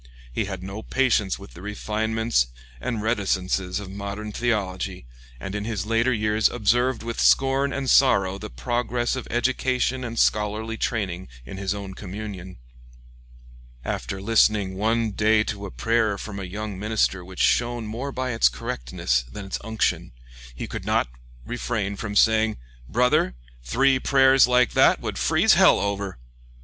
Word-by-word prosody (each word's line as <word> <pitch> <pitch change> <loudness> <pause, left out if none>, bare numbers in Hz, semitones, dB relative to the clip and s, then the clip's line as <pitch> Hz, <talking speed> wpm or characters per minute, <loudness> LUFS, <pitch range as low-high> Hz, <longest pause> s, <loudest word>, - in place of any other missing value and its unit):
He - - -1
had 95 -2 -6
no 95 +3 -6
patience 115 -6 +1
with 100 0 -13
the 85 - -12
refinements 110 - 0 0.3
and 110 - -3
reticences 95 -4 0
of 100 -2 -8
modern 100 +2 -5
theology, 100 - -2 0.3
and 95 +7 -6
in 105 0 -3
his 105 -3 -3
later 115 +3 +2
years 110 -1 +2
observed 120 +2 +1
with 115 0 -3
scorn 135 +1 +3
and 140 -1 -3
sorrow 100 -9 +4
the - - -7
progress 120 - -1
of 130 - -6
education 130 +1 0
and 115 -1 -5
scholarly 105 +2 +1
training 95 -6 -2 0.2
in 80 - -8
his 100 +1 -2
own 100 -2 -6
communion. 95 -1 -7 1.3
After 60 +10 -3
listening 105 -2 +2
one 110 +2 +1
day 105 +1 +3
to 100 -2 -5
a - - -8
prayer 110 -3 +1
from 100 0 -7
a 95 - -5
young 100 +1 -5
minister 105 -3 0
which 95 +1 -11
shone 120 -1 +2
more 120 +6 -4
by 130 -1 -2
its 115 - +4
correctness - - -2
than 105 -1 -7
its 95 - -4
unction, 110 - -1 0.4
he - - -5
could - - -6
not - - +1 0.4
refrain 110 -4 -2
from 105 0 -5
saying, 110 0 +3 0.3
"Brother, 120 - +2 0.3
three 130 - +2
prayers 135 -1 +5
like 125 0 +3
that - - +4
would - - -4
freeze - - +4
hell - - +6
over!" 100 -3 -3
110 Hz, 155 wpm, -24 LUFS, 95-120 Hz, 1.3 s, hell